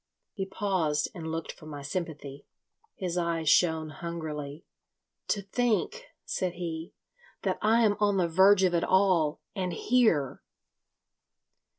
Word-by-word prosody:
He 195 Hz, -3 st, -4 dB
paused 180 Hz, -7 st, 0 dB
and 160 Hz, -3 st, -5 dB
looked 165 Hz, 0 st, -3 dB
for 155 Hz, -, -14 dB
my 145 Hz, -2 st, -7 dB
sympathy. 145 Hz, -3 st, -5 dB, 0.5 s
His 180 Hz, -3 st, -2 dB
eyes 165 Hz, -2 st, -1 dB
shone 160 Hz, -1 st, +3 dB
hungrily. 155 Hz, -2 st, -6 dB, 0.6 s
"To 200 Hz, -, 0 dB
think," 215 Hz, -1 st, 0 dB, 0.2 s
said 180 Hz, -2 st, -2 dB
he, 165 Hz, -2 st, -5 dB, 0.5 s
"that -, -, -1 dB
I 225 Hz, +2 st, +4 dB
am 205 Hz, -1 st, +3 dB
on 205 Hz, -1 st, +2 dB
the 180 Hz, -2 st, +2 dB
verge 190 Hz, +3 st, +5 dB
of 180 Hz, -1 st, +3 dB
it 170 Hz, -, +2 dB
all, 185 Hz, -6 st, +3 dB
and 185 Hz, -2 st, -2 dB
here! 220 Hz, -, +2 dB
170 Hz, 130 wpm, -29 LUFS, 160-195 Hz, 0.6 s, verge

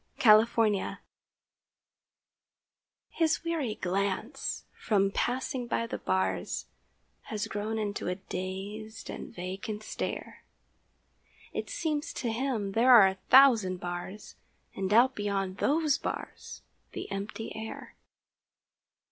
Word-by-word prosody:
THE -, -, -5 dB, 0.3 s
PANTHER 215 Hz, -4 st, +1 dB, 2.1 s
His 325 Hz, -1 st, +1 dB
weary 310 Hz, -10 st, -1 dB
glance, 200 Hz, +8 st, -2 dB
from 195 Hz, -3 st, +1 dB
passing 250 Hz, +2 st, -1 dB
by 230 Hz, -, 0 dB
the 230 Hz, -, -5 dB
bars, 95 Hz, 0 st, -1 dB, 0.6 s
Has 210 Hz, -2 st, -3 dB
grown 210 Hz, +2 st, -3 dB
into 210 Hz, -1 st, -2 dB
a 180 Hz, -, 0 dB
dazed 195 Hz, +4 st, -6 dB
and -, -, -7 dB
vacant 195 Hz, +4 st, -5 dB
stare; -, -, -5 dB, 1.1 s
It -, -, -4 dB
seems 305 Hz, -2 st, -2 dB
to 235 Hz, -, -2 dB
him 225 Hz, -4 st, -1 dB
there 235 Hz, +5 st, +4 dB
are 215 Hz, -6 st, +9 dB
a 190 Hz, 0 st, -7 dB
thousand 235 Hz, -9 st, +7 dB
bars 175 Hz, +4 st, -6 dB, 0.4 s
And 195 Hz, 0 st, -2 dB
out 245 Hz, +4 st, +6 dB
beyond 195 Hz, -3 st, -2 dB
those 300 Hz, +2 st, +2 dB
bars -, -, -6 dB, 0.3 s
the -, -, -5 dB
empty 200 Hz, +3 st, -5 dB
air. 220 Hz, 0 st, -7 dB
215 Hz, 110 wpm, -29 LUFS, 195-245 Hz, 2.1 s, are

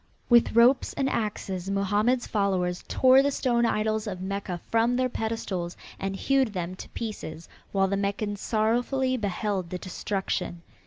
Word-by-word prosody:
With 240 Hz, -1 st, +5 dB
ropes 245 Hz, +3 st, +5 dB
and 270 Hz, -, 0 dB
axes 195 Hz, -6 st, -2 dB
Mohammed's 205 Hz, +5 st, +1 dB
followers 185 Hz, -4 st, 0 dB
tore 260 Hz, +1 st, +6 dB
the 280 Hz, -, +2 dB
stone 240 Hz, -4 st, +1 dB
idols 215 Hz, 0 st, 0 dB
of 185 Hz, -3 st, -4 dB
Mecca 190 Hz, -1 st, -4 dB
from 230 Hz, +2 st, +3 dB
their 255 Hz, 0 st, +1 dB
pedestals 215 Hz, -7 st, -3 dB, 0.2 s
and 195 Hz, 0 st, -2 dB
hewed 265 Hz, 0 st, +1 dB
them 180 Hz, -1 st, -3 dB
to -, -, -9 dB
pieces, 170 Hz, -8 st, -6 dB, 0.2 s
while 195 Hz, -1 st, +2 dB
the 200 Hz, -, 0 dB
Meccans 205 Hz, +1 st, -2 dB
sorrowfully 245 Hz, +4 st, +1 dB
beheld 200 Hz, -4 st, -2 dB
the 180 Hz, -, -3 dB
destruction. 185 Hz, -2 st, -3 dB
210 Hz, 150 wpm, -27 LUFS, 190-235 Hz, 0.2 s, tore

